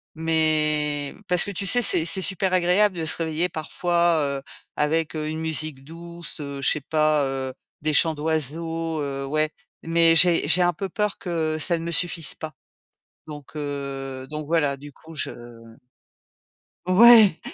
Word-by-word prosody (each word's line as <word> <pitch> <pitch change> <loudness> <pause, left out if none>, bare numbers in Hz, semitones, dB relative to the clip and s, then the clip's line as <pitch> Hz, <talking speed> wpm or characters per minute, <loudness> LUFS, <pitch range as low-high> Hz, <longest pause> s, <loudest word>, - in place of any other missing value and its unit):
Mais, 155 -2 0
parce 180 -1 +3
que, 205 - -5
tu 195 +1 -4
sais, 245 +5 +4
c'est 160 - +4
c'est 190 +3 +3
super 190 0 -1
agréable 185 +2 +3
de 165 - -3
se 160 - +2
réveiller, 165 +2 -1
parfois, 170 +1 0 0.2
heu, - - -14 0.4
avec, 160 +2 0
heu, 155 0 -3
une 155 +1 -4
musique 155 -3 -3
douce, 170 +2 -6
heu, 140 -1 -6
je 135 - +3
sais 150 - 0
pas, 155 0 +1
heu, 135 -1 -4 0.3
des 155 0 -1
chants 160 +2 +4
d'oiseaux, 160 +1 -2
heu, 140 -1 -4
ouais, 155 +2 0 0.3
mais, 165 0 +3
j'ai 170 -3 +4
j'ai 175 +4 +3
un 175 0 +2
peu 195 +5 -5
peur 210 +2 -2
que 160 -3 -2
ça 170 +2 +1
ne 165 - -7
me 170 - -4
suffise 170 -1 +1
pas. 155 0 -8 0.7
Donc, 145 -3 -11
heu, 135 -2 -6
donc, 150 -1 -6
voilà, 145 -4 0
du 145 +1 -12
coup, 160 +1 -15
je, 150 - -3
mmh 115 -1 -13 1.1
ouais, 215 -1 +7
160 Hz, 170 wpm, -23 LUFS, 145-170 Hz, 1.1 s, ouais